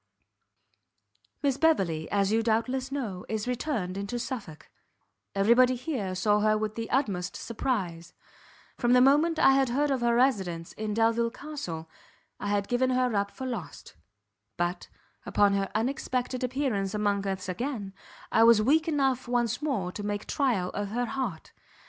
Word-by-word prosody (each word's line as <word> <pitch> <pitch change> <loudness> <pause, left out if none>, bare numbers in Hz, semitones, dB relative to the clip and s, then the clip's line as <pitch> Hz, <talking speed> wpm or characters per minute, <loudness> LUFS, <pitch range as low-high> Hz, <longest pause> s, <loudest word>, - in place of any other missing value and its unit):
"Miss 275 -2 +2
Beverley, 185 - +1
as 200 0 +1
you 225 +1 +3
doubtless 250 +4 0
know, 220 -10 -4
is 220 +1 -2
returned 235 -8 -2
into 200 +5 -3
Suffolk; 235 - -6 0.7
every 200 +4 +5
body 255 +1 +4
here 240 -8 -3
saw 205 +3 +2
her 215 0 +3
with 215 0 -2
the 225 0 -5
utmost 195 -9 -1
surprize; 195 -9 -3 0.7
from 240 -1 +3
the 250 - +7
moment 295 +6 +4
I 270 - +6
had 270 -1 +3
heard 285 +4 +1
of 265 -2 0
her 235 0 +2
residence 190 -10 +1
in 215 -1 -4
Delvile 230 +1 +2
Castle, 205 - -6 0.5
I - - -4
had 200 -1 0
given 255 +1 +1
her 255 -1 +1
up 200 -1 0
for 260 - -8
lost; 235 -10 -6 0.6
but, 175 +1 -2 0.4
upon 205 -1 +3
her 195 -1 0
unexpected 255 +2 -1
appearance 245 -7 -1
among 205 -1 0
us 190 -1 -3
again, 200 0 -4 0.4
I 225 - +4
was 230 -1 +7
weak 305 +9 +3
enough 270 -5 +1
once 240 0 0
more 220 -12 -1
to 205 - -6
make 205 0 -3
trial 230 -11 0
of 205 0 -3
her 240 +4 -1
heart. 240 -11 -4
230 Hz, 160 wpm, -28 LUFS, 200-255 Hz, 0.7 s, the